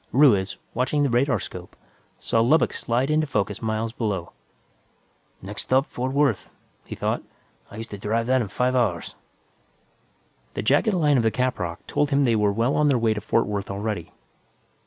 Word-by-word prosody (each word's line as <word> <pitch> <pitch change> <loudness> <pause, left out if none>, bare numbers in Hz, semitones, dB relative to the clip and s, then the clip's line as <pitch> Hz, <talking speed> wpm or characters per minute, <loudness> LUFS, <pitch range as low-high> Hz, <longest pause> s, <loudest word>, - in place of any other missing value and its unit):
Ruiz, 110 -9 +4 0.2
watching 130 +4 +1
the 140 - +2
radarscope, 125 +3 -1 0.4
saw 115 - +1
Lubbock 145 +8 +3
slide 125 +5 0
into 155 0 +2
focus 105 -5 -2
miles 110 0 -2
below. 105 -7 -3 1.1
Next 100 +2 -4
stop, 130 +2 +2
Fort 130 -2 -4
Worth, 140 -7 +1 0.4
he - - -7
thought. - - -1 0.5
I 100 - -11
used 115 +1 -7
to 100 - -7
drive 115 +3 -1
that 130 +1 +2
in 110 - -2
five 125 +6 0
hours. 105 -9 0 1.4
The - - -2
jagged 145 - +3
line 150 -5 +3
of 120 - +2
the 110 - +4
caprock 110 -9 -2
told 145 - 0
him 140 0 +3
they 120 -4 +3
were 105 -1 +2
well 115 +6 +1
on 150 - +3
their 140 -3 +3
way 115 -2 +2
to 105 - -5
Fort 115 +2 +1
Worth 100 -1 -4
already. 100 -3 -4
115 Hz, 175 wpm, -24 LUFS, 105-135 Hz, 1.4 s, Ruiz